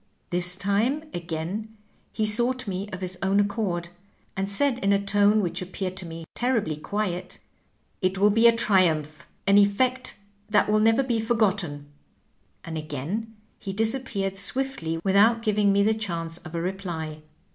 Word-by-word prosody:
This 180 0 +3
time, 210 +10 +1
again, 175 +6 -5 0.3
he 215 - -1
sought 240 +3 +1
me 195 +1 -3
of 185 -2 -7
his 180 -1 -4
own 195 +1 +2
accord, 200 -4 -1 0.5
and 195 +1 -2
said 250 +5 +2
in 200 -4 +1
a 200 - +4
tone 205 +1 +4
which 180 0 -2
appeared 185 0 -4
to 185 - -3
me 165 0 -8
terribly 230 -10 0
qniet, 180 +3 -2
^ - - -14 0.6
It 185 0 0
will 205 +2 +4
be 225 +3 +5
a 230 - +5
triumph, 160 -8 +1 0.2
an 200 +1 +5
e£Eect 250 +6 +2 0.4
that 210 -1 +3
will 210 0 +3
never 225 +4 +4
be 240 -3 0
forgotten,' 200 -10 0 0.8
and 160 -1 -4
again 160 - -5 0.2
he 195 -3 -5
disappeared 220 -3 -1
swift 265 +5 0
ly 165 0 -2
without 220 +4 +4
giving 210 -2 +2
me 200 0 +3
the 220 +2 +3
chance 170 -6 -4
of 170 -2 -10
a 165 - -1
reply. 170 -5 -4
200 Hz, 165 wpm, -25 LUFS, 175-220 Hz, 0.8 s, be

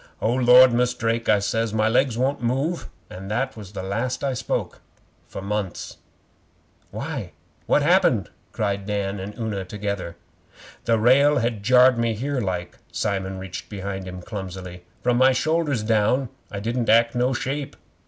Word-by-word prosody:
'"O 115 - +1
Lord, 125 0 +7
Mus' 125 +1 +1
Drake," 115 0 -1
I 105 - +6
says, 110 +2 -1
"my 110 0 +2
legs 120 +1 +2
won't 135 +2 0
move," 135 +8 -1 0.2
and 95 +2 -9
that 125 +5 -1
was 105 -3 -10
the 95 - -5
last 115 +7 -2
I 135 -1 0
spoke 115 -2 -3 0.5
for 95 - -7
months.' 100 -2 -4 0.9
'Why? - - -5 0.3
What - - +3
had - - +3
happened?' - - +3 0.2
cried 100 -2 -2
Dan 100 -1 -2
and 100 +2 -7
Una 110 -4 -3
together. 100 -2 -4 0.7
'The 115 -1 +3
rail 140 +6 +5
had 115 -4 -1
jarred 125 +2 +5
me 115 -1 +1
in - - -7
here 135 +2 -2
like.' 90 -3 -4
Simon 95 -1 -2
reached 95 -1 -7
behind 95 -2 -5
him 90 -1 -8
clumsily. 90 -3 -7 0.2
'From 120 -1 +2
my 130 +1 +5
shoulders 150 -3 0
down 115 +4 +2 0.2
I 100 - -4
didn't 115 +3 -2
act 115 +1 +5
no 125 +1 +1
shape. 140 +3 -3
115 Hz, 165 wpm, -23 LUFS, 100-125 Hz, 0.9 s, Lord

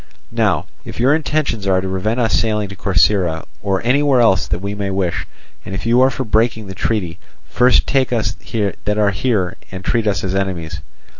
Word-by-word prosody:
Now - - +1 0.2
if - - -9
your 130 +4 +4
intentions 150 -9 -1
are 95 -1 +3
to 95 - -3
prevent 100 +6 -1
us 115 -2 +1
sailing 105 -3 +1
to 95 - -8
Corcyra, 90 -3 +1 0.2
or 95 -1 -1
anywhere 135 +1 +3
else 95 -7 +3
that - - -1
we 100 +3 -4
may 100 -1 -3
wish, 95 -2 -2 0.4
and 95 - -6
if 95 - -5
you 120 +2 +4
are 130 - +6
for 130 0 -3
breaking 110 -1 +1
the 95 - -7
treaty, 90 -3 -2 0.3
first 125 0 +3
take 135 -3 +1
us 110 -3 0
that 105 -1 -3
are 105 -1 +3
here 95 -3 -1
and 95 0 -8
treat 115 -2 +1
us 100 - 0
as 95 -1 -2
enemies." 85 -5 -3
105 Hz, 200 wpm, -18 LUFS, 95-115 Hz, 0.4 s, are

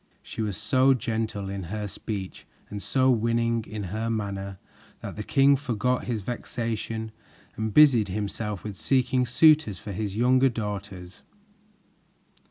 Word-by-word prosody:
She - - -6
was 105 -4 -2
so 130 +3 +3
gentle 110 -4 -3
in 95 -1 -5
her 105 +4 -4
speech 100 -1 -6 0.2
and 100 -1 -5
so 130 +3 +2
winning 115 0 +1
in 105 -2 -5
her 110 +1 -2
manner 100 -3 -3 0.4
that - - -6
the 105 - -5
king 135 +5 +4
forgot 125 -2 -1
his 115 -4 -3
vexation 115 -1 -4 0.4
and 110 0 -2
busied 130 -6 +6
himself 105 +1 -4
with 105 -2 -6
seeking 125 0 +1
suitors 150 - +4
for 105 - -8
his 100 +1 -4
younger 130 +3 +4
daughters. 100 -5 -6
110 Hz, 140 wpm, -26 LUFS, 100-125 Hz, 0.4 s, busied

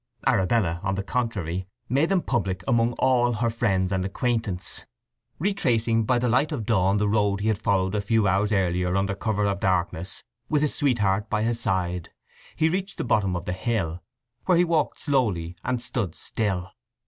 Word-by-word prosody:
Arabella, 95 -3 +2
on 95 0 -1
the 100 - -2
contrary, 95 -6 -2 0.2
made 140 +7 +2
them 195 -3 +2
public 95 -7 -1
among 115 0 +2
all 120 -1 +2
her 115 +1 0
friends 100 -5 0
and 95 -1 0
acquaintances. 105 -2 -2 0.5
Retracing 120 - +1
by 125 +2 +2
the 125 +1 0
light 130 +6 +2
of 125 -8 -3
dawn 100 -3 +2
the 105 0 +1
road 100 -1 +1
he 110 - +1
had 110 - 0
followed 95 -1 +1
a 105 - 0
few 110 0 +2
hours 100 +3 +2
earlier 90 -2 +1
under 100 +1 +1
cover 105 0 -1
of 100 -1 0
darkness, 90 -1 -1 0.3
with 150 -1 +2
his 150 - +1
sweetheart 105 -7 +1
by 105 -1 0
his 115 +1 0
side, 90 -5 -1 0.5
he 160 - +2
reached 190 +3 -2
the - - -2
bottom 100 -6 +1
of 90 - -4
the 90 - -2
hill, 90 -4 -2 0.4
where 180 -2 +4
he 175 - +5
walked 165 -3 0
slowly, 105 - 0
and 125 -2 -1
stood 120 -8 -3
still. 95 -4 -3
105 Hz, 185 wpm, -25 LUFS, 95-120 Hz, 0.5 s, he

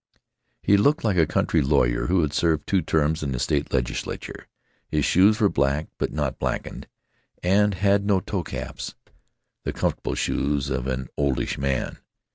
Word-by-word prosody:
He 100 - +5
looked 145 +9 +3
like 105 -5 +1
a 80 -3 +4
country - - +1
lawyer 65 -4 +2
who 90 -1 +3
had 75 -1 -1
served 80 -1 +1
two 95 -2 +2
terms 80 0 +1
in 70 -3 -2
the - - -2
state - - 0
legislature. 60 -1 -3 0.4
His 75 -2 +1
shoes 100 +4 +4
were 105 - +5
black, 70 -1 0
but - - -1
not 75 -2 -2
blackened, - - -3 0.6
and 100 +2 +3
had 100 +1 +2
no 100 -2 +2
toe - - -3
caps—the - - -9
comfortable - - -2
shoes 70 -1 -1
of 65 0 -2
an 65 -1 -2
oldish 70 -3 0
man. 70 -1 -2
75 Hz, 160 wpm, -24 LUFS, 70-95 Hz, 0.6 s, He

